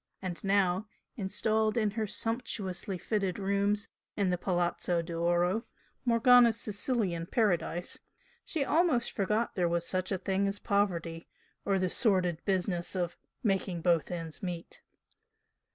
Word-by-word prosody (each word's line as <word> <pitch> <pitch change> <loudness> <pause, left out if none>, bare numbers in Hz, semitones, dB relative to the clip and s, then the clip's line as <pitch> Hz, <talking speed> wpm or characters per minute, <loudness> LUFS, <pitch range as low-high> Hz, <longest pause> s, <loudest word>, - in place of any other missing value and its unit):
And 180 -2 -5
now, 195 0 +2 0.3
installed 215 +2 0
in 215 -3 +2
her 220 +2 -3
own 215 - 0
sumptuously 205 -5 -2
fitted 195 -1 -1
rooms 200 +1 +1 0.3
in 195 -3 +2
the 180 - +1
Palazzo 175 -1 0
d'Oro, 175 +5 +1 0.4
Morgana's 240 0 +6
Sicilian 200 -5 0
paradise, 175 -5 0 0.4
she 305 -5 -1
almost 310 -8 +2
forgot 210 +3 0
there 175 -2 +1
was 170 0 0
such 185 +1 0
a 190 - +1
thing 195 +1 0
as 200 +1 -2
poverty, 175 -6 -1 0.4
or 195 -1 +2
the 185 -1 +1
sordid 180 -5 +1
business 185 -2 0
of 175 -2 -1 0.3
"making 190 -4 0
both 170 -3 +2
ends 165 -3 -6
meet." 175 -3 -6
195 Hz, 135 wpm, -31 LUFS, 175-215 Hz, 0.4 s, Morgana's